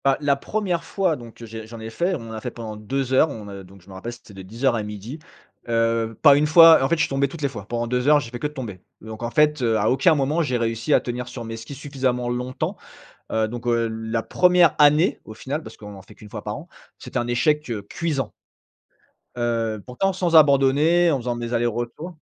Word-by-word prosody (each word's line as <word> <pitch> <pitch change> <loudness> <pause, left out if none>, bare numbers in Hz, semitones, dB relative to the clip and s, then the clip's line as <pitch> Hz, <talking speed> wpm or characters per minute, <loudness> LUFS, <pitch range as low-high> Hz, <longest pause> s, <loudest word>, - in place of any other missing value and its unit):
Bah, 135 -1 +3
la 145 -2 +2
1re 180 +2 -2
fois 180 -1 0
donc 120 -2 -12
j'ai 110 0 -9
j'en 115 0 -10
ai 110 0 -7
fait. 175 +9 0
On 115 -6 -8
en - - -8
a 110 - -6
fait 125 - -4
pendant 115 -2 -8
2 130 +5 -3
heures, 155 +4 +5
on, 110 -7 -8
heu, 100 -1 -8
donc 95 +1 -16
je - - -26
me 95 - -12
rappelle 95 +6 -6
c'était 115 -3 -14
de 95 - -9
10:00 115 +7 -1
à 110 - -1
12:00, 105 +7 -7 0.5
heu, 115 -1 0
pas 145 -3 +8
1 150 +1 +2
fois 165 +1 +8
en 135 - +1
fait, 170 - +3
je 165 - -1
suis - - +1
tombé 135 0 +1
toutes 150 +2 -9
les - - +3
fois. 105 -6 -9
Pendant 120 0 -2
2 125 +2 -1
heures, 150 0 +6
j'ai 115 -5 -8
fait 120 - -6
que 150 - -1
de 150 - -13
tomber 110 - -7 0.2
donc 110 +1 -9
en 120 - -2
fait, 150 +1 +2
heu, 115 -2 +2
à 110 +1 +2
aucun 140 +6 +4
moment 145 +4 0
j'ai 130 -6 0
réussi 115 +3 -2
à - - +5
tenir 125 0 -5
sur 125 -1 -7
mes 115 0 -6
skis 115 +5 -9
suffisamment 130 -4 -2
longtemps, 125 +1 -3 0.5
heu, 110 0 +1
donc, 120 +2 -7
heu, 115 -1 +1
l 110 0 -6
la 115 0 0
1re 180 +2 +4
année 150 +4 +4
au 110 - -9
final, 140 +7 -5
parce - - -11
qu'on 105 -1 -10
en 95 - -12
fait - - -16
qu'1 105 - -14
fois - - -7
par - - -4
an, - - -11 0.3
c'était - - -6
un 120 - -1
échec, 150 +5 +1
heu, 110 -3 -3
cuisant. 140 +6 -3 1.1
Heu, 115 -3 -1
pourtant 130 +11 -1
sans 180 -2 0
abandonner, 150 +4 +5
en 140 - +1
faisant 120 -1 -3
mes 120 0 -5
allers-retours. 120 +8 -2
125 Hz, 250 wpm, -23 LUFS, 115-150 Hz, 1.1 s, pas